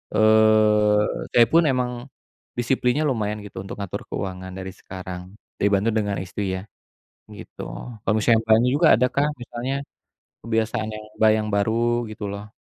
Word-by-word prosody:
Eee, 110 -1 +5 0.3
saya 120 - +8
pun 165 0 +5
emang 125 -2 +1 0.7
disiplinnya 125 +3 +1
lumayan 105 -7 -1
gitu 100 -2 -9
untuk 95 +1 -7
ngatur 100 - -5
keuangan 95 -1 -5
dari 95 0 -6
sekarang, 95 0 -9 0.2
dibantu 100 +2 +2
dengan 105 -2 -1
istri 95 +1 -3
ya, 95 - -5 0.7
gitu. - - -11 0.4
Kalau - - +1
misalnya 115 +1 +4
Mbaknya 110 +3 +4
juga 160 +3 +4
ada 125 +3 +2
kah 140 +1 +3
misalnya 120 +2 -4 0.7
kebiasaan 110 0 -1
yang, 110 0 -9
Mbak, 110 0 +6
yang 105 - -3
baru 115 +3 +1
gitu 110 -1 -6
loh? 100 +1 -8
110 Hz, 145 wpm, -23 LUFS, 100-120 Hz, 0.7 s, saya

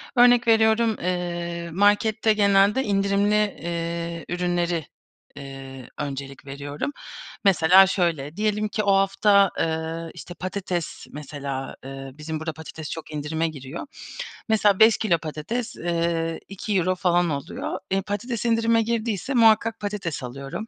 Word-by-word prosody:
Örnek 245 -1 +6
veriyorum, 220 0 +4
eee, 175 -1 -3
markette 210 +3 +3
genelde 200 +3 +4
indirimli, 200 0 +2
eee, 170 -4 -2
ürünleri, 175 -2 -1 0.5
eee, 135 -2 -9
öncelik 140 -1 -5
veriyorum. 145 - -5 0.5
Mesela 185 +1 +7
şöyle, 165 -5 -1
diyelim 215 0 0
ki 215 +1 -2
o 200 -1 +3
hafta, 195 0 +4
eee, 160 0 -2
işte, 175 - -9
patates 180 -2 -4
mesela, 140 -2 -6
eee, 135 0 -7
bizim 155 +2 -5
burada 160 0 -4
patates 160 0 -8
çok 160 -1 -7
indirime 160 +2 -1
giriyor. 150 - -7 0.6
Mesela 210 -2 +3
5 220 0 +7
kilo 190 -7 +2
patates, 165 +10 -4
eee, 165 -1 -1
€2 185 -2 0
falan 175 -1 +2
oluyor. 140 -2 -4
Eee, 195 0 +2
patates 225 +4 -4
indirime 230 0 +3
girdiyse 230 +2 -2
muhakkak 225 -1 +4
patates 200 -9 -4
alıyorum. 135 - -6
175 Hz, 125 wpm, -24 LUFS, 160-210 Hz, 0.6 s, Mesela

